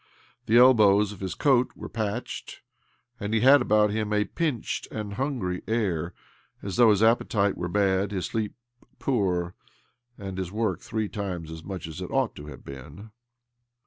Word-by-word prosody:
The 115 - +5
elbows 105 -5 +6
of 105 - -10
his 95 -2 -4
coat 130 -3 +2
were - - -7
patched, 110 +1 -5 0.6
and 105 +2 -2
he 110 - +2
had 135 +2 +7
about 105 -2 +3
him 105 0 -2
a 105 0 +2
pinched 145 - -2
and 105 -2 -5
hungry 105 -8 -2
air, 90 -7 -1 0.5
as 100 -3 -4
though 120 -2 +7
his 105 0 +3
appetite 110 -3 +2
were 90 - -3
bad, 95 +1 +1
his 95 -3 -2
sleep 110 -2 -3 0.4
poor, 90 -8 0 0.6
and 95 -1 -6
his 95 -1 -4
work 105 -4 -1
three 110 -2 -2
times 90 -7 -5
as 80 0 -8
much 95 -2 -6
as 80 -1 -7
it - - -5
ought - - 0
to 75 - -9
have - - -11
been. 75 +11 -10
105 Hz, 170 wpm, -26 LUFS, 95-110 Hz, 0.6 s, had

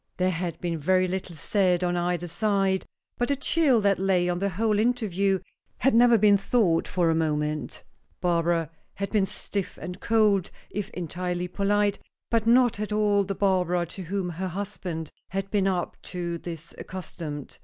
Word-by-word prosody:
There 185 0 +2
had 175 -1 -3
been 170 -2 -2
very 185 +4 +3
little 185 -1 -4
said 180 +2 +1
on 175 0 +1
either 175 0 -1
side, 195 +1 0 0.3
but 245 - +1
the 280 - +1
chill 275 -2 +3
that 200 -2 +2
lay 185 -2 +2
on 175 0 -1
the 200 +1 0
whole 210 +3 +1
interview 200 -5 +1 0.4
had 270 +3 +2
never 235 0 +6 0.2
thawed 195 -4 +2
for 175 -3 +2
a - - +3
moment. 150 -3 -1 0.4
Barbara 170 -2 +1 0.2
had 200 0 -4
been 205 -3 +2
stiff 200 -1 -4
and 180 +1 -6
cold, 210 -4 +3 0.2
if 205 0 -3
entirely 180 +1 -3
polite, 205 +2 +1 0.3
but 230 -1 +2
not 240 -2 +4
at 210 0 -3
all 210 -1 +3
the 195 0 -3
Barbara 180 -3 +1
to 180 +3 -9
whom 185 +1 -2
her 180 +3 -3
husband 180 -4 -5 0.2
had 195 +1 -3
been 200 -2 +2
up 180 -2 -1
to 170 -1 -4
this 165 -1 -8
accustomed. 165 -6 -7
185 Hz, 165 wpm, -26 LUFS, 175-205 Hz, 0.4 s, never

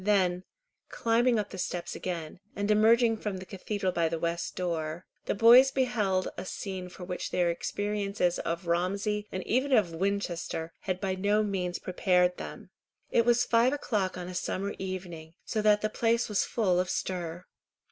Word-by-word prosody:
Then, 185 -3 +2 0.4
climbing 235 +1 +2
up 210 - -2
the 190 - -7
steps 175 -1 -3
again, 170 -3 -5 0.2
and 205 +1 0
emerging 225 +2 +5
from 210 -3 -4
the 185 - -8
cathedral 195 +1 -3
by 170 -2 +1
the 165 - -2
west 170 +1 -2
door, 170 -1 -3 0.2
the - - -1
boys 240 +5 +8
beheld 225 -8 0
a 180 - -4
scene 185 -1 -5
for 180 - -10
which 180 0 -4
their 175 -1 +2
experiences 200 0 -1
of 170 +2 -3
Romsey, 200 +5 0
and 185 - -4
even 260 +4 +1
of 205 -8 +3
Winchester, 175 -3 -2
had 185 -1 -3
by 190 -1 -1
no 205 +3 +2
means 185 -4 -2
prepared 180 -1 +2
them. - - -8 0.4
It 230 - +3
was 240 0 +4
five 235 +3 +3
o'clock 205 -10 -1
on 180 -1 -5
a 185 - -6
summer 195 +2 -2
evening, 175 -4 -6
so 215 - -1
that 210 0 +4
the 215 - +1
place 230 +2 +1
was 210 -2 +1
full 185 -6 +1
of 180 0 0
stir. 175 -1 -3
190 Hz, 175 wpm, -29 LUFS, 180-215 Hz, 0.4 s, boys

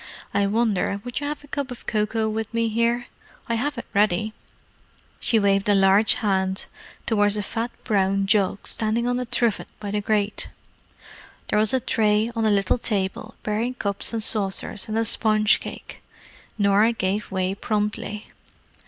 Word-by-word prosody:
I 200 0 +2
wonder 205 -2 +1
would 245 -1 -4
you 285 - -3
have 295 0 -5
a - - -14
cup 280 -1 -3
of 250 - -9
cocoa 220 +1 0
with 220 +1 -3
me 230 0 +1
here? 235 +2 +1 0.4
I 235 - -1
have 275 +4 -1
it 235 - -5
ready." 210 +1 +2 0.9
She 230 - +2
waved 200 -1 +2
a 205 - +5
large 195 +2 +5
hand 190 -3 0 0.4
towards 205 -2 +2
a 210 - -1
fat 230 +3 -3
brown 195 -2 +1
jug 200 -1 +1
standing 225 +2 0
on 245 0 0
a 250 - -2
trivet 230 -2 0
by 205 -1 -5
the 210 0 0
grate. 205 0 0 1.0
There - - +2
was 215 0 +5
a 260 - +2
tray 215 -1 +1
on 225 -1 +1
a - - +4
little 200 +3 +2
table, 210 +1 -2
bearing 225 +4 -1
cups 200 -4 -2
and 225 -2 -2
saucers 205 -2 -1
and 220 0 -2
a 225 - +1
spongecake. 215 -1 0 0.6
Norah 205 +2 +4
gave 205 -1 -2
way 190 0 -1
promptly. 210 0 -2
215 Hz, 165 wpm, -24 LUFS, 200-230 Hz, 1.0 s, a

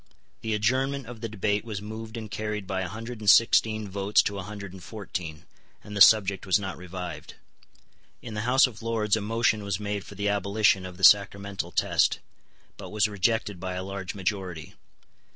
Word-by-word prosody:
The 110 -1 -1
adjournment 130 +5 0
of 115 -1 -10
the 115 - -4
debate 105 0 -1
was 110 -3 -5
moved 110 +2 -7
and 110 -2 -7
carried 105 -2 -3
by 95 0 -2
a 95 - -3
hundred 115 +3 -7
and 105 -2 +1
sixteen 110 -1 +4
votes 100 +1 +2
to 100 -1 -3
a - - -3
hundred 100 -1 -8
and 95 - -11
fourteen; 90 -7 -6 0.4
and 105 - -9
the 100 - -2
subject 100 -3 +6
was 95 - +4
not 95 -2 -5
revived. 90 -4 -8 0.8
In 115 - -9
the 105 - -3
House 130 +1 +6
of 115 -4 -7
Lords 110 -2 +1
a 110 - -2
motion 110 0 +1
was 100 -1 -2
made 105 -1 -3
for 100 - -12
the 100 +1 -2
abolition 100 -1 +2
of 90 -1 -11
the 95 - -11
sacramental 100 0 +4
test, - - +2 0.6
but - - -9
was 105 0 +2
rejected 105 -1 -1
by 95 0 -4
a 90 - -3
large 95 0 -6
majority. 90 -4 -4
105 Hz, 190 wpm, -27 LUFS, 95-110 Hz, 0.8 s, subject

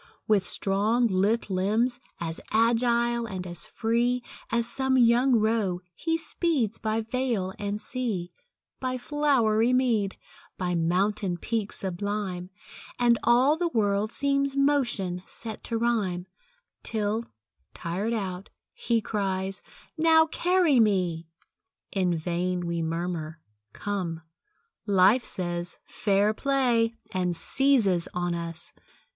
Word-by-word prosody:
With 210 -3 +3
strong, 210 +5 +2
lithe 205 +2 +1
limbs, 220 +7 +1 0.2
as 165 -2 -3
agile 235 +1 +2
and 185 -3 -5
as 175 -1 -4
free, 240 +2 0 0.3
As 235 0 +2
some 265 +2 +1
young 245 +2 +5
roe, 215 -5 +1
he 325 - -1
speeds 315 - 0
by 220 0 -1
vale 225 -5 -2
and 205 0 -3
sea, 215 -9 -3 0.5
By 255 -1 -2
flowery 250 -5 +2
mead, 230 -6 +1 0.4
by 180 -1 -1
mountain 180 +3 0
peak 220 +2 -2
sublime, 190 -1 -3 0.5
And 240 -1 +3
all 255 +5 +4
the 350 +1 0
world 210 -6 0
seems 280 0 +1
motion 250 -11 +1
set 220 -2 -6
to 230 - -2
rhyme, 210 -7 0 0.6
Till, 220 +1 -1 0.5
tired 190 +7 -2
out, 190 -3 -4 0.2
he 230 -1 0
cries, 195 -2 -2 0.4
"Now 320 0 +6
carry 345 -4 +2
me!" 180 -7 +1 0.6
In 185 -3 +1
vain 175 +2 -2
we 170 0 -2
murmur; 165 -1 -3 0.3
"Come," 180 - -4 0.6
Life 200 +5 +5
says, 175 -1 -3
"Fair 205 +1 +1
play!" 245 -3 +2 0.2
And 180 -2 0
seizes 220 -7 +2
on 175 -1 -1
us. 170 -1 -5
215 Hz, 115 wpm, -27 LUFS, 185-240 Hz, 0.6 s, Now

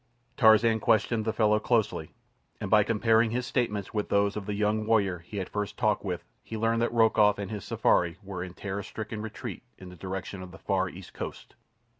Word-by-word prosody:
Tarzan 110 -1 +5
questioned 110 +1 +2
the 110 - +1
fellow 105 -1 +3
closely, 115 -1 0 0.4
and - - -5
by 105 -1 +7
comparing 115 +1 +3
his 120 +2 -2
statements 115 -6 -1
with 105 -2 -2
those 100 0 +2
of 105 -2 -5
the 105 - -2
young 105 +1 0
warrior 100 -6 +2
he 90 +5 -9
had 95 -2 -2
first 105 -2 -4
talked - - +1
with - - -3 0.2
he 110 - -6
learned 115 +1 +1
that 120 - +1
Rokoff 110 -3 +4
and 100 -1 -5
his 105 -3 -5
safari 85 -2 +2
were 95 -2 -5
in 90 -1 -9
terror 100 0 -4
stricken 110 +2 -6
retreat 110 0 -6 0.2
in 95 - -11
the 90 - -11
direction 95 +1 -5
of 90 - -8
the - - -12
far 95 -2 0
East 90 +1 -11
Coast. - - -7
105 Hz, 205 wpm, -28 LUFS, 95-110 Hz, 0.4 s, by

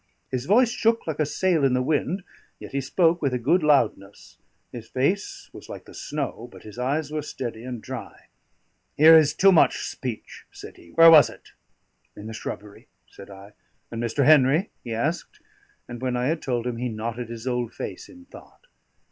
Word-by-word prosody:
His 130 0 -3
voice 235 +5 +4
shook 225 0 0
like 160 -2 -4
a 155 - +1
sail 175 -1 0
in 130 -2 +3
the 125 - +1
wind, 160 +6 -1 0.3
yet - - -11
he 140 - -2
spoke 165 +5 +1
with 135 -4 0
a - - +1
good 145 +10 +2
loudness; 115 -9 0 0.3
his 115 -2 -10
face 200 - -2
was - - -12
like - - -9
the - - -14
snow, 135 -5 -5
but - - -14
his 110 +2 -11
eyes 145 +4 -2
were 155 0 -2
steady 120 -5 -6
and 125 -3 -7
dry. - - -9 0.7
"Here 160 +2 +8
is 155 -1 +4
too 195 +3 +5
much 170 - +3
speech," 125 -5 -7
said - - -12
he. 85 - -17
"Where 165 - +7
was 150 -5 +8
it?" - - -16 0.6
"In 105 - -10
the 110 - -7
shrubbery," 105 -1 -8 0.2
said 100 - -13
I. 100 +1 -13 0.4
"And 115 0 -5
Mr. 120 +4 0
Henry?" 150 +5 +4
he 120 - -7
asked. 155 +9 -3 0.5
And 120 0 -9
when 125 -1 -1
I 125 - -1
had 160 0 -2
told 120 -3 -2
him 125 -2 -3
he 125 +1 -3
knotted 115 +2 -5
his 115 0 -8
old 125 -2 -2
face - - -8
in 270 0 -15
thought. 290 - -16
130 Hz, 195 wpm, -24 LUFS, 120-160 Hz, 0.7 s, Here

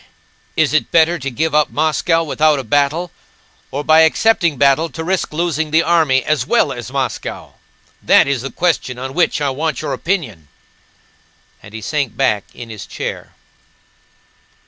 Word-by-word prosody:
Is - - +2
it - - +1
better 165 +1 +3
to 135 - -4
give 155 +6 -2
up 150 0 +3
Moscow 160 +2 +1
without 155 0 +2
a 135 - -4
battle, 145 +8 0 0.6
or 145 +2 -4
by 155 +1 +5
accepting 165 -1 +3
battle 140 +5 +3
to 160 - -6
risk 185 +1 -1
losing 160 -1 -1
the 160 +2 +3
army 155 -6 +2
as 155 -1 0
well 240 - +2
as 120 0 -8
Moscow? 135 -3 -4 0.5
That - - +5
is 140 -3 -1
the 135 - -5
question 160 -8 -1
on 130 +1 -6
which 170 -2 +1
I 140 -2 0
want 150 0 -3
your - - -2
opinion," 135 - -3 1.1
and 100 +2 -13
he 110 - -6
sank 145 -1 -2
back 105 -7 +1
in 120 -2 -9
his 105 -3 -9
chair. - - -6
150 Hz, 165 wpm, -17 LUFS, 130-165 Hz, 1.1 s, by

